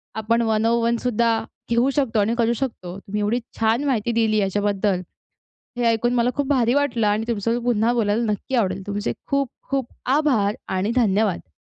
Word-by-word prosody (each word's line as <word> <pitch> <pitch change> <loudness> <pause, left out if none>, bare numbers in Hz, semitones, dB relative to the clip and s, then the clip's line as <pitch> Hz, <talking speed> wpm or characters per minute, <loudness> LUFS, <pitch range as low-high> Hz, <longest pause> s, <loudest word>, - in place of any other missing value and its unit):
आपण 225 +2 +1
one 220 -1 +1
on 230 +1 +3
one 235 0 +2
सुद्धा 230 -1 +1 0.3
घेऊ 235 +3 +3
शकतो 265 -7 +1
आणि 210 +3 +2
करू 235 0 +2
शकतो. 220 -8 -5
तुम्ही 205 +1 -5
एवढी 215 +4 +1 0.2
छान 225 +4 +2
माहिती 240 -4 0
दिली 225 -2 +2
याच्याबद्दल, 200 -1 0 0.8
हे 245 - -1
ऐकून 230 +1 +2
मला 240 0 +2
खूप 285 -1 0
भारी 250 -3 +2
वाटलं 255 -6 +1
आणि 210 +2 +1
तुमच्या 230 -1 0
सोबत 240 0 -2
पुन्हा 235 -1 +2
बोलायला 225 -1 +1
नक्की 210 +5 -5
आवडेल 195 -4 0
तुमचे 205 +1 -2
खूप 275 -1 0 0.2
खूप 270 -3 -1 0.3
आभार 240 -10 +2 0.2
आणि 195 +4 0
धन्यवाद! 205 - +1
230 Hz, 180 wpm, -22 LUFS, 210-240 Hz, 0.8 s, on